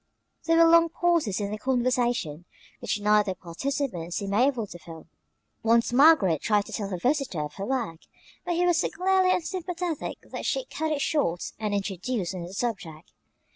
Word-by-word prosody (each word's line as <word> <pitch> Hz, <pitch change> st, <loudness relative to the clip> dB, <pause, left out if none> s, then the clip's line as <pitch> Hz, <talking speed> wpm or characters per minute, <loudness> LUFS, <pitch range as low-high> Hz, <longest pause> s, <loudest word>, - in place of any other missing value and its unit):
There 330 Hz, 0 st, +3 dB
were 335 Hz, -, +7 dB
long 335 Hz, 0 st, +6 dB
pauses 330 Hz, -, +1 dB
in 200 Hz, -1 st, -3 dB
the 215 Hz, -, -4 dB
conversation, 245 Hz, -, 0 dB, 0.3 s
which -, -, -2 dB
neither 210 Hz, -2 st, +2 dB
participant 180 Hz, -, -4 dB
seemed 200 Hz, -1 st, -3 dB
able 245 Hz, +1 st, +2 dB
to 175 Hz, -3 st, -11 dB
fill. 165 Hz, -1 st, -11 dB, 0.6 s
Once 230 Hz, +1 st, +2 dB
Margaret 250 Hz, -, +5 dB
tried 210 Hz, -2 st, +2 dB
to -, -, -11 dB
tell 200 Hz, -2 st, -3 dB
her 185 Hz, -, -3 dB
visitor 255 Hz, -, 0 dB
of 150 Hz, -, -7 dB
her 195 Hz, -, -4 dB
work, 235 Hz, -11 st, -2 dB, 0.4 s
but 350 Hz, -, -2 dB
he 355 Hz, +1 st, +2 dB
was 350 Hz, -2 st, +3 dB
so -, -, 0 dB
clearly 375 Hz, 0 st, +2 dB
unsympathetic 355 Hz, -2 st, -3 dB
that -, -, -6 dB
she -, -, -1 dB
cut 315 Hz, -9 st, -3 dB
it 290 Hz, -2 st, -1 dB
short 225 Hz, -, 0 dB
and 210 Hz, -2 st, -1 dB
introduced 195 Hz, 0 st, -3 dB
another 180 Hz, 0 st, -7 dB
subject. 195 Hz, -8 st, -4 dB
230 Hz, 175 wpm, -26 LUFS, 190-315 Hz, 0.6 s, were